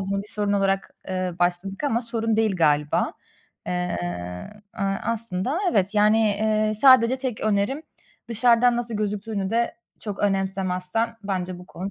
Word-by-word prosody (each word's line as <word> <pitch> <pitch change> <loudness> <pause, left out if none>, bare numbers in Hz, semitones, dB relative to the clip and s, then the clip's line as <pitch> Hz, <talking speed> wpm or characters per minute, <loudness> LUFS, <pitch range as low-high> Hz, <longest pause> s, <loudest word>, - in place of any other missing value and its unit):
buna 195 +1 -2
bir 210 - -12
sorun 205 -1 -1
olarak, 195 -1 +1 0.2
ııı, 185 -2 -3
başladık 180 +6 -1
ama 235 -5 +1
sorun 225 -1 -1
değil 220 -3 +2
galiba. 150 -3 +2 0.5
Eee, 180 0 -1 0.8
aaa, 195 0 -1
aslında 230 - -2
evet 200 - +1
yani, 210 +1 +4
eee, 215 0 +1
sadece 255 +1 +6
tek 255 -4 -3
önerim 215 +7 0 0.5
dışarıdan 235 +1 +4
nasıl 235 -1 -3
gözüktüğünü 205 -1 -2
de 235 +1 0 0.3
çok 205 -3 -5
önemsemezsen 195 +2 -1
bence 185 -2 -3
bu 180 - -12
konu 190 +2 -6
205 Hz, 140 wpm, -24 LUFS, 190-230 Hz, 0.8 s, sadece